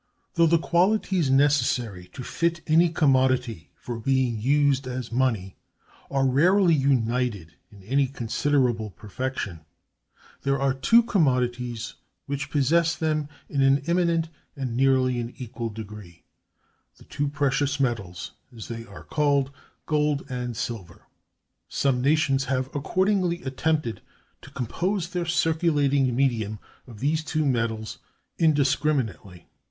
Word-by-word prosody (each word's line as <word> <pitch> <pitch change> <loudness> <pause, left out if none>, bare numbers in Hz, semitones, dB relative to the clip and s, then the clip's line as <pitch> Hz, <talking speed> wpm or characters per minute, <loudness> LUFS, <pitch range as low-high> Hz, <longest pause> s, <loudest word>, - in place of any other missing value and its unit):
Though 170 -2 +4
the 170 +1 +4
qualities 180 -1 +1
necessary 125 -9 +2
to 125 - -7
fit 170 +5 -1
any 165 +2 +4
commodity 130 - +1
for 120 -2 -6
being 130 -2 +1
used 140 +1 +2
as 125 -2 -5
money 115 -7 0 0.5
are 135 -1 +1
rarely 170 +7 +4
united 125 - 0 0.2
in 100 -2 -15
any 135 +6 +1
considerable 125 -2 0
perfection, 105 -2 -5 0.8
there 140 0 0
are 135 -1 +2
two 230 - +4
commodities 125 - 0 0.3
which 140 0 -4
possess 165 +4 +2
them 155 -3 -1 0.2
in 140 - -1
an 135 +1 +4
eminent 170 -1 +1 0.3
and 130 -5 -4
nearly 130 -1 +2
an 120 0 -5
equal 120 -2 -5
degree—the 105 -5 -14
two 145 - -3
precious 140 -1 0
metals, 105 - -2 0.3
as 110 - -8
they 115 -1 -5
are - - -11
called—gold 145 +1 -1
and 125 -2 -4
silver. 110 -7 -6 0.7
Some 130 -3 +1
nations 140 -1 +2
have 130 +1 -2
accordingly 180 +3 0
attempted 135 -2 -1 0.4
to - - -13
compose 175 - -2
their 180 -1 -3
circulating 150 -6 +2
medium 115 -5 0 0.3
of 115 -4 -12
these 155 +3 +1
two 155 0 -1
metals 115 -4 -1 0.4
indiscriminately. 135 - +1
135 Hz, 120 wpm, -25 LUFS, 120-155 Hz, 0.8 s, Though